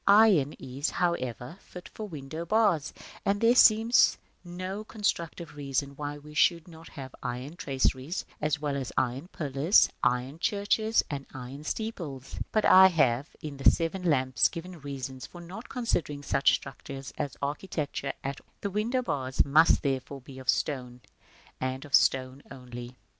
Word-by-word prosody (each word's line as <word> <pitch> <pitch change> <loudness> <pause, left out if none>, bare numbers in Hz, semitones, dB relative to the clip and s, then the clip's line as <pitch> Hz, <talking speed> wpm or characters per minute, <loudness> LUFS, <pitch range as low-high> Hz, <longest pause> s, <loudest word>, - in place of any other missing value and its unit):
Iron 200 -9 +6
is, 135 +3 -4
however, 130 - -2
fit 180 -1 -11
for 215 - -7
window 155 -1 -6
bars, 190 -6 +2 0.3
and 200 +1 +1
there 230 +2 +5
seems 230 -1 +6 0.3
no 185 +3 -5
constructive 170 -7 -3
reason 140 -1 -2
why 145 0 -5
we 150 +1 -13
should 170 +2 +3
not 165 -1 -13
have 130 -3 -9
iron 125 +5 -5
traceries, 135 +2 -1 0.2
as 150 -1 0
well 145 -2 -2
as 135 -3 -3
iron 130 +6 0
pillars, 150 +2 +3
iron 125 +5 0
churches, 215 +3 +1
and 140 -1 -5
iron 130 +3 -8
steeples. 155 - -5
But 215 - +2
I 190 0 +9
have, 140 -6 +2
in 145 -2 -6
the 135 - +6
"Seven 170 +3 -1
Lamps," 130 -7 +3
given 170 -1 -8
reasons 135 -2 -6
for 175 - -12
not 190 +7 -9
considering 170 - -2
such 140 - +3
structures 135 0 -8
as 145 -3 -3
architecture 145 -1 -3
at 135 0 -4
all. - - -36
The 200 - -2
window 230 +6 0
bars 130 - 0
must, 155 +4 +5
therefore, 135 0 -2
be 130 +1 -11
of 130 -1 -7
stone, 125 -4 -1 0.6
and 130 +2 -3
of 145 - -14
stone 130 +1 +3
only. 125 -2 -8
§ - - -11
V. - - -28
145 Hz, 160 wpm, -28 LUFS, 135-180 Hz, 0.6 s, I